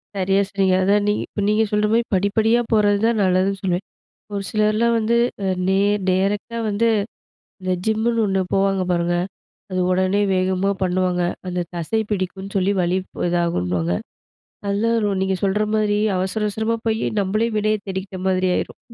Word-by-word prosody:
.சரியா 195 +1 +2
சொன்னீங்க. 195 -2 +1
அதான் 205 +2 +3
நீ 205 - +3
இப்ப 205 - -5
நீங்க 210 +1 +3
சொல்ற 210 0 +2
மாரி, 235 +1 +3
படிப்படியா 220 +5 +2
போறது 205 -2 +4
தான் 230 -1 +2
நல்லதுன்னு 190 +1 +1
சொல்வேன். 180 0 -1 0.5
ஒரு 200 - -2
சிலர்லாம் 215 +2 +2
வந்து 225 +1 +1 0.3
அ, - - 0 0.2
நேர் 200 +2 +2
டேரக்ட்டா 200 +5 0
வந்து, 210 +3 +1 0.7
இந்த 185 0 -1
ஜிம்முனு 225 +2 +1
1 190 -1 +1
போவாங்க 195 -1 +2
பாருங்க, 175 0 +1 0.5
அது 185 0 -1
உடனே 185 +2 +2
வேகமா 185 +1 +1
பண்ணுவாங்க. 180 -1 +1 0.3
அந்த 180 0 -2
தசை 175 +7 -1
பிடிக்கும்னு 190 0 -4
சொல்லி 195 +1 +2
வலிப் 185 +2 -2
இதாகும்ன்னுவாங்க. 90 - 0 0.7
நல்லா 205 +3 +1
அதுவும், 205 -3 0
நீங்க 190 0 +1
சொல்ற 200 +2 +2
மாதிரி 210 -1 +1 0.2
அவசர, 190 +4 -2
அவசரமா 220 +2 -1
போயி, 220 0 0 0.2
நம்மளே 215 +4 0
வினைய 215 +1 +1
தேடிக்கிட்ட 190 0 -5
மாதிரி 185 0 +2
ஆயிரும்.. - - -4
195 Hz, 150 wpm, -21 LUFS, 185-215 Hz, 0.7 s, போறது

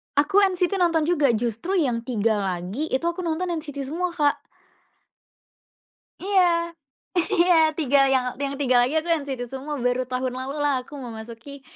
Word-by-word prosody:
Aku 385 +8 +4
NCT 375 0 +1
nonton 335 -3 +2
juga, 300 -5 +2
justru 235 - -2
yang 260 -10 +2
3 220 -3 +1
lagi 190 - -3
itu 260 +5 -1
aku 340 +1 -1
nonton 345 +1 -2
NCT 280 -2 -6
semua 360 +3 -1
Kak. 290 -2 +1 1.8
Iya. 350 -3 +2 0.6
Iya 355 -1 +4 0.2
3 275 -3 +3
yang 260 -1 +2 0.2
yang 280 0 -2
3 255 -3 +3
lagi 260 +6 +1
aku 315 - -1
NCT 285 -7 -1
semua 285 +3 -5
baru 250 0 0
tahun 255 0 -2
lalu 260 +2 -5
lah 270 -3 +2
aku 290 +3 -11
memasuki 235 +2 -9
285 Hz, 155 wpm, -24 LUFS, 250-340 Hz, 1.8 s, Aku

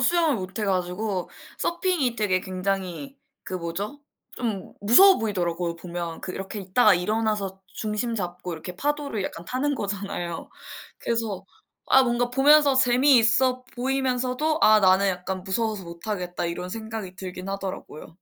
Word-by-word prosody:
수영을 315 0 +3
못해 190 +2 -4
가지고 185 +1 -1 0.3
서핑이 340 -9 0
되게 185 -4 +1
굉장히 190 +8 -3 0.3
그 185 - -6
뭐죠 190 +10 -4 0.4
좀 220 -6 -3
무서워 370 - +7
보이더라고요, 175 -5 -1
보면. 170 -1 -6
그 185 - -5
이렇게 195 +2 -6
있다가 200 +3 +4
일어나서 205 0 -1
중심 220 +2 -3
잡고 180 -1 -4
이렇게 170 +3 -7
파도를 285 -3 -2
약간 170 -2 -6
타는 280 +3 0
거잖아요. 195 -5 -4 0.5
그래서 220 -5 -2 0.4
아 265 - +6
뭔가 240 0 0
보면서 285 +1 +5
재미있어 255 -1 +4
보이면서도 265 +3 0
'아 215 0 +6
나는 190 +1 +5
약간 185 0 -3
무서워서 210 0 -1
못 170 0 -10
타겠다.' 180 -4 -3
이런 175 +2 -4
생각이 220 -2 -6
들긴 185 0 -7
하더라고요. 195 -5 -6
210 Hz, 340 characters per minute, -25 LUFS, 185-250 Hz, 0.5 s, 무서워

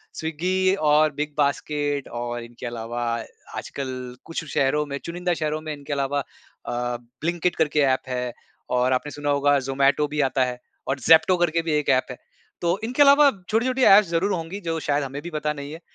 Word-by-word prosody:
Swiggy 185 +4 0
और 155 -3 +3
big 150 +1 -3
basket 145 0 0
और 120 0 -4
इनके 120 +1 -10
अलावा 120 0 -4 0.6
आजकल 130 -2 -5
कुछ 165 - -4
शहरों 150 +3 +2
में 140 -1 -4
चुनिंदा 175 +1 -1
शहरों 155 -1 -2
में 155 -1 -5
इनके 145 0 -6
अलावा 140 0 0
अ, 140 - -10 0.5
ब्लिंकिट 175 +2 0
करके 150 -1 +1
ऐप 130 -2 +3
है 125 -1 -2 0.4
और 125 +1 +2
आपने 145 +3 -1
सुना 145 0 -4
होगा 145 0 +3
ज़ोमैटो 135 +2 +2
भी 150 0 -1
आता 135 -1 +2
है 125 -1 -5 0.3
और 135 +1 -1
ज़ेप्टो 160 +7 +5
करके 170 -1 +1
भी 165 -1 -3
एक 150 -1 0
ऐप 130 -1 +3
है। 125 - -8 0.4
तो 170 +2 +1
इनके 250 +5 0
अलावा 285 +1 +7 0.2
छोटी-छोटी 255 +4 +1
ऐप्स 200 -1 +7
ज़रूर 170 +4 +1
होंगी 170 +2 -4
जो 165 -2 -2
शायद 145 -1 0
हमें 135 +1 -5
भी 170 - -7
पता 150 -1 -1
नहीं 140 -1 -7
है। 160 - -8
150 Hz, 190 wpm, -24 LUFS, 135-165 Hz, 0.6 s, अलावा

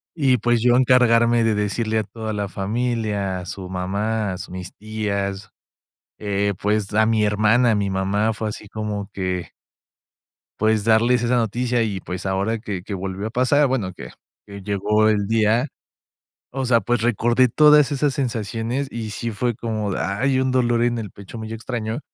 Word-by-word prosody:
Y 135 -5 +3
pues, 120 +1 +1
yo 120 0 +4
encargarme 120 -2 +4
de 110 -1 +2
decirle 110 +2 0
a - - -1
toda 110 +1 -6
la 100 -2 -3
familia, 105 -2 -2
a 90 - -8
su 95 -1 -7
mamá, 100 +3 -2
a - - -6
su - - -8
mis 90 -1 -7
tías. 100 -2 -4 0.7
Eh, 100 -1 0
pues, 105 0 0
a 110 0 +4
mi 110 -1 +2
hermana, 110 +4 +3
a - - +2
mi 100 -1 0
mamá. 100 +3 0
Fue 110 0 -3
así 105 0 -9
como 105 -2 -4
que 90 -3 -3 1.1
pues, 110 -1 +2
darles 115 +2 +3
esa 120 +1 +2
noticia. 120 +1 0
Y 100 -4 -2
pues, 90 +2 -6
ahora 100 +4 0
que 100 -5 -5
que 100 - -6
volvió 95 +2 -4
a - - -10
pasar 130 +4 +3
Bueno 115 -9 -1
que - - -10 0.4
que 100 -1 -9
llegó 105 +2 +1
el 105 -2 +1
día. 115 +5 +2 0.8
O 135 0 -3
sea, 115 -2 +4
pues, 120 +2 0
recordé 120 +2 +3
todas 150 +1 +5
esas 140 -1 +1
sensaciones, 115 +1 -2
y 110 -2 -5
sí 115 +2 -4
fue 120 +2 -1
como 110 -3 -3
de - - -3
¡Ay! 130 +7 0
Un 130 - +1
dolor 120 -2 +2
en 120 -1 +1
el 105 -3 -5
pecho 100 +3 -11
muy 110 0 -6
extraño. 115 +1 -4
110 Hz, 180 wpm, -22 LUFS, 100-120 Hz, 1.1 s, todas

